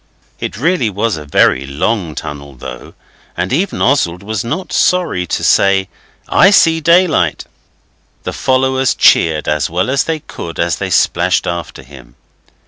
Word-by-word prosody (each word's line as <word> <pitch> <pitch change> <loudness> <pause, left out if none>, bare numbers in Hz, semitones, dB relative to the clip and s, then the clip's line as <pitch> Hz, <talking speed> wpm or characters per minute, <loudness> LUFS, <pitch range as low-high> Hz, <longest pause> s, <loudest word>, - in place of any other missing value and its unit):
It - - -5
really 155 -2 +1
was 105 +2 -1
a 75 -2 -8
very 70 -2 +2
long 80 +3 -2
tunnel, 70 -2 -8
though, - - -10 0.4
and 90 +6 -2
even 180 +6 -1
Oswald 90 -10 +1
was 110 0 -3
not 160 +11 -4
sorry 175 - +1
to - - -3
say, 95 -1 +3 0.4
'I 195 - +5
see 165 -5 +4
daylight.' 170 - +2 0.8
The - - -5
followers 130 0 +1
cheered 80 -2 +3
as 75 0 0
well 90 +9 -1
as 135 - +1
they 160 -1 -2
could 85 - -8
as 85 -3 0
they - - -4
splashed 90 +1 +1
after 85 -6 -5
him. 65 -3 -15
95 Hz, 150 wpm, -14 LUFS, -, 0.8 s, I